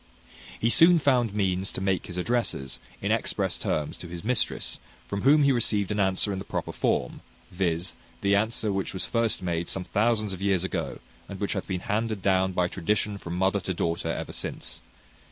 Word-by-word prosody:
He 115 - +2
soon 170 +5 +7
found 125 -7 +3
means 95 -2 0
to - - -4
make 95 -1 0
his 90 - -6
addresses, 90 - -1 0.2
in - - +1
express - - 0
terms, 75 -2 -1
to 90 - -8
his 85 +1 -7
mistress, 120 +1 0 0.3
from 100 +9 -3
whom 145 +3 +6
he 140 - +5
received 105 -5 +1
an 105 - -1
answer 95 +1 +1
in 95 - -3
the - - -5
proper - - -3
form, 65 - -1 0.3
viz.: 90 -1 -1 0.3
the 100 0 +3
answer 110 0 +1
which 95 0 -2
was 95 - 0
first 115 -5 +1
made 85 -1 -1
some 95 - -2
thousands 105 0 +1
of 95 - -7
years 95 -3 +2
ago, 95 - -2 0.3
and 100 - -7
which 100 - 0
hath 95 - -3
been 90 -2 -2
handed 110 -1 -1
down 95 -1 +3
by 90 -1 +2
tradition 100 +3 -1
from 85 -1 -5
mother 95 +2 +2
to 95 -1 -3
daughter 85 0 -1
ever - - -4
since. - - -4
100 Hz, 195 wpm, -27 LUFS, 90-110 Hz, 0.3 s, soon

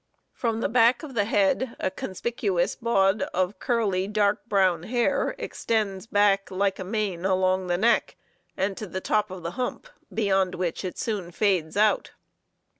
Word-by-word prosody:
From 230 -2 -2
the - - +1
back 240 +2 +4
of 290 -4 -8
the 205 -4 +1
head 215 +4 +1
a 185 - -1
conspicuous 190 -1 -2
baud 195 -3 +2
of 185 +2 0
curly, 200 -6 0
dark 210 0 +1
brown 190 -6 +2
hair 240 +6 0
extends 210 -3 -2
back 205 -2 +2
like 195 +1 0
a - - -3
mane 195 -3 -2
along 185 -1 +1
the 175 0 +1
neck 230 +5 +2 0.4
and 195 +1 0
to 215 - -5
the 190 - -4
top 210 +2 0
of 185 -2 -8
the 170 - -3
hump, 250 - -3 0.2
beyond 195 -4 +1
which 175 0 -2
it 185 - -5
soon 205 -6 -3
fades 185 -3 0
out. 210 0 +2
200 Hz, 165 wpm, -26 LUFS, 185-220 Hz, 0.4 s, back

